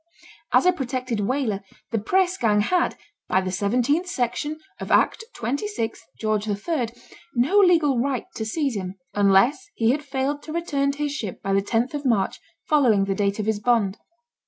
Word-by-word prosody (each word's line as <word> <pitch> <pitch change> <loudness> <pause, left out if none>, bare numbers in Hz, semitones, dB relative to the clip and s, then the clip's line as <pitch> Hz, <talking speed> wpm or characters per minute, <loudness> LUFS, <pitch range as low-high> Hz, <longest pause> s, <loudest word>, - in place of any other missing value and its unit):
As - - +4
a 365 - +7
protected 255 -6 -3
whaler, 220 -2 0 0.3
the 225 - +1
press 370 - +2
gang 210 - +2
had, 355 - +1 0.3
by 185 - +3
the 185 -1 -2
17th 245 - +1
section 295 +1 -2 0.2
of - - -6
Act - - +3
26 240 - -3 0.2
Geo. 215 -1 +1
III. 220 +7 -2 0.5
no 275 +13 +4
legal 325 -9 +4
right 265 0 -1
to 220 - -4
seize 275 +3 -1
him, 185 -1 -4 0.2
unless 205 - +3
he 225 0 +3
had 295 +3 -1
failed 280 +1 -2
to 310 - -9
return 285 -5 0
to - - -11
his 290 - -1
ship 215 -10 -5
by 195 - 0
the 195 - +3
10th 245 +7 -1
March 225 -8 +1 0.3
following 245 -10 +4
the 195 - 0
date 200 0 0
of 215 - -2
his 220 -1 0
bond. 215 -3 +1
245 Hz, 175 wpm, -24 LUFS, 210-290 Hz, 0.5 s, a